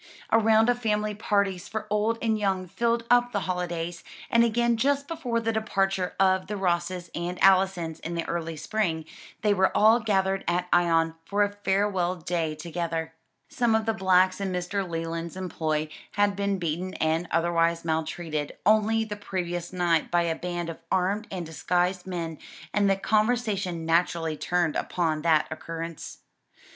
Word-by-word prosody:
A 225 - +6
round 220 0 +4
of 245 0 +2
family 210 -2 0
parties 200 -3 0
for 220 0 -4
old 215 +2 +1
and 225 -1 +2
young 195 -3 0
filled 235 +5 0
up 245 0 +4
the 205 -3 -1
holidays; 175 -2 -3 0.3
and 235 0 +5
again 235 +1 +2
just 280 +4 +1
before 255 -8 -2
the 225 0 0
departure 195 -4 0
of 190 -1 +3
the 210 - -3
Rosses 175 -1 -1
and 175 +1 -3
Allisons 190 -4 +3
in 170 +1 -5
the 170 - -2
early 165 -1 -3
spring, 165 -2 -1 0.4
they 210 -1 +4
were 190 -1 +3
all 220 +3 +6
gathered 195 -3 +1
at 180 +1 0
Ion 165 -2 +3
for 205 +4 +1
a 205 - 0
farewell 195 -3 0
day 165 -2 -2
together. 165 0 -4 0.3
Some 235 -3 +1
of 220 0 +1
the 225 - +1
blacks 185 -1 +3
in 195 -1 -1
Mr. 180 +1 -2
Leland's 165 +1 -4
employ 155 -4 -2 0.3
had 205 -1 +2
been 200 0 0
beaten 175 +2 -3
and 160 +2 0
otherwise 170 0 +1
maltreated 160 -1 -2
only 220 +1 +3
the 210 -1 -5
previous 175 -4 -4
night 175 -3 +1
by 175 0 +2
a 165 -1 0
band 175 -1 -4
of 165 - -11
armed 195 +4 +1
and 180 -3 -4
disguised 180 +3 -1
men, 165 -4 -4 0.3
and 205 -1 +3
the 195 - +4
conversation 210 -5 0
naturally 165 -1 +1
turned 175 0 0
upon 160 -3 -1
that 155 -1 +3
occurrence. 165 0 -6
185 Hz, 165 wpm, -26 LUFS, 170-210 Hz, 0.4 s, A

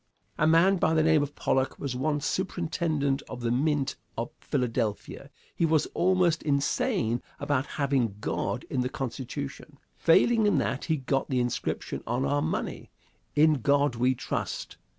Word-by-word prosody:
A 155 - +4
man 170 +5 +5
by 160 -2 +2
the 155 - +4
name 160 -1 +4
of 145 0 -4
Pollock 130 0 0
was 135 -3 -4
once 145 +2 -1
superintendent 160 -6 -1
of 125 - -7
the 115 -1 0
mint 140 +2 0 0.2
of - - -3
Philadelphia. 115 +2 -2 0.3
He - - -1
was 160 -2 +3
almost 180 -2 +2
insane 140 -5 0 0.2
about 145 -1 0
having 135 -7 +1
God - - -2
in 130 - -1
the 125 - -1
Constitution. 135 +3 -6 0.2
Failing 220 +6 +4
in 205 - +3
that, 135 - -1
he 160 -2 +1
got 135 0 -1
the 130 -2 +1
inscription 120 -1 -2
on 120 +3 0
our 145 0 +1
money, - - -3 0.5
"In 150 -2 +4
God 140 +1 +3
we 125 +2 +2
Trust." - - -4
145 Hz, 155 wpm, -28 LUFS, 130-160 Hz, 0.5 s, man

